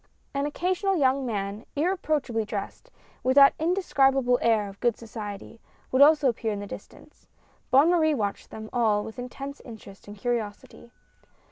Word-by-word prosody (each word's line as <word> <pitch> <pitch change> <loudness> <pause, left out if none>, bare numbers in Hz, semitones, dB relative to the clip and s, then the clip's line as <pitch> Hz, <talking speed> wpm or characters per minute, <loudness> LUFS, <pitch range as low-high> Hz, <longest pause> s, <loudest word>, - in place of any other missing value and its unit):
An 280 +1 -1
occasional 370 +5 -1
young 265 -2 +2
man 205 -1 -4
irreproachably 300 - 0
dressed, 210 - -6 0.3
with 260 +1 +1
that 275 -1 +8
indescribable 270 -8 +2
air 220 -3 +2
of 195 0 -12
good 240 -3 +1
society, 215 -1 -8 0.3
would 260 - +3
also 295 -1 +6
appear 230 -2 -1
in 205 - -3
the 205 - -6
distance. - - -12 0.4
Bonne 280 +6 +5
Marie 315 -3 +3
watched 205 -5 -3
them 220 0 -8
all 220 -4 +2
with 220 +4 -9
intense 275 +3 -7
interest 210 -5 -12
and 205 +1 -10
curiosity. 235 0 -4
245 Hz, 150 wpm, -26 LUFS, 215-285 Hz, 0.4 s, that